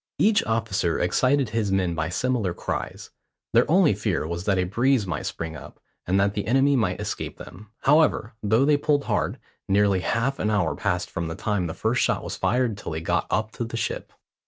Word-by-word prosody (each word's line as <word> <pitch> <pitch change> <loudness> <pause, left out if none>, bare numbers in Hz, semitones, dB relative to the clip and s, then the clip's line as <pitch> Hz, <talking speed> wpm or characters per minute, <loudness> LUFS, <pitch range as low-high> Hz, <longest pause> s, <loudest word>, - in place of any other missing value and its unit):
Each 210 0 +3
officer 110 -7 0
excited 130 +7 +2
his 105 -2 -1
men 95 -3 +1
by 80 -1 -2
similar 110 -2 -1
cries. - - -5 0.4
Their 120 +4 +4
only 175 - +5
fear 100 -5 -1
was 85 +3 -4
that 100 -2 +2
a 90 - +2
breeze 120 +5 +1
might 85 -5 -3
spring 80 -1 -5
up, - - -11 0.3
and 95 +2 +2
that 100 +1 +2
the 105 - -3
enemy 135 +4 +3
might 115 -4 0
escape - - -4
them. 100 +5 -12
However, 145 -6 +3
though 110 +5 +3
they 150 0 +4
pulled 145 -1 +1
hard, - - -1 0.3
nearly 100 -1 +3
half 115 +8 -1
an 105 - 0
hour 100 -7 +1
passed 90 -3 -2
from 85 -3 -3
the 80 - -5
time 105 -5 -1
the 80 - -6
first 115 +3 0
shot - - +1
was - - -5
fired 120 -4 0
till 85 - -5
they 80 - -3
got - - 0
up 110 0 0
to 120 - -4
the 115 0 -5
ship. - - -3
105 Hz, 205 wpm, -25 LUFS, 90-125 Hz, 0.4 s, only